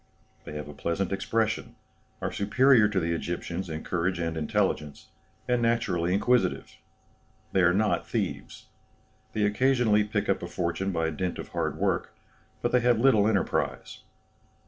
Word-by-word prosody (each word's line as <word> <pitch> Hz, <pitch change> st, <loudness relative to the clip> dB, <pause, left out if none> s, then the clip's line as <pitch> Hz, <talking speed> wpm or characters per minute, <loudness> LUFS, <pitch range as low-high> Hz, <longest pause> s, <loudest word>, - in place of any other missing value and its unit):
They -, -, -8 dB
have 75 Hz, 0 st, -5 dB
a 75 Hz, -, -9 dB
pleasant 85 Hz, +6 st, -2 dB
expression, 110 Hz, +2 st, -1 dB, 0.5 s
are -, -, -1 dB
superior 115 Hz, +3 st, +4 dB
to 105 Hz, -2 st, 0 dB
the 85 Hz, -1 st, -1 dB
Egyptians 85 Hz, +2 st, -4 dB
in 80 Hz, 0 st, -5 dB
courage 90 Hz, +1 st, -1 dB
and 85 Hz, -1 st, -2 dB
intelligence, 75 Hz, -1 st, -1 dB, 0.4 s
and 125 Hz, -1 st, +1 dB
naturally 115 Hz, -7 st, +1 dB
inquisitive. 120 Hz, +6 st, +1 dB, 0.8 s
They 95 Hz, -, +2 dB
are 90 Hz, 0 st, +5 dB
not 105 Hz, +3 st, +1 dB
thieves. -, -, -4 dB, 0.7 s
They 110 Hz, -, 0 dB
occasionally 110 Hz, 0 st, +3 dB
pick 105 Hz, 0 st, -2 dB
up 100 Hz, -, +1 dB
a 85 Hz, -, -4 dB
fortune 90 Hz, +2 st, -2 dB
by 80 Hz, -2 st, -1 dB
dint 90 Hz, +3 st, -3 dB
of -, -, -7 dB
hard -, -, -2 dB
work, -, -, -1 dB, 0.5 s
but -, -, +1 dB
they 125 Hz, -, +4 dB
have 120 Hz, -1 st, +3 dB
little 115 Hz, -5 st, +4 dB
enterprise. 105 Hz, -4 st, -1 dB
95 Hz, 150 wpm, -27 LUFS, 85-110 Hz, 0.8 s, are